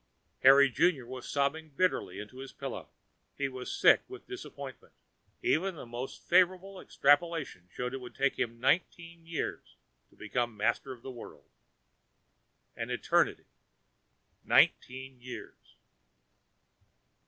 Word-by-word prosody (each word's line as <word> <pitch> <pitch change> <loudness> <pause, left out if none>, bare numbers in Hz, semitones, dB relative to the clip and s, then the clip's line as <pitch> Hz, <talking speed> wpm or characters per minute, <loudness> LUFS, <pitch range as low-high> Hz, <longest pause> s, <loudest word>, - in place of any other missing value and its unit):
Harry 140 +1 +8
Junior 135 0 +2
was 130 +1 -8
sobbing 145 +3 0
bitterly 145 - 0
into 105 +5 -9
his 135 0 -8
pillow. - - -6 0.5
He 140 - 0
was 130 -1 -6
sick - - +6
with 390 0 -10
disappointment. 380 -1 -9 0.5
Even 195 - +1
the 145 - -8
most 120 +2 -7
favorable 185 +2 +3
extrapolation 145 - +1
showed 125 +1 -4
it 135 - -5
would 125 - -10
take 140 0 +1
him 115 0 -2
nineteen 165 +4 0
years 165 -1 -4 0.3
to - - -24
become 120 +1 -2
master 110 +5 0
of 125 -2 -10
the 135 - -6
world. 120 -2 -12 1.2
An - - -4
eternity. - - +1 1.0
Nineteen 130 0 +2
years! 125 +1 -10
135 Hz, 120 wpm, -31 LUFS, 125-170 Hz, 1.2 s, Harry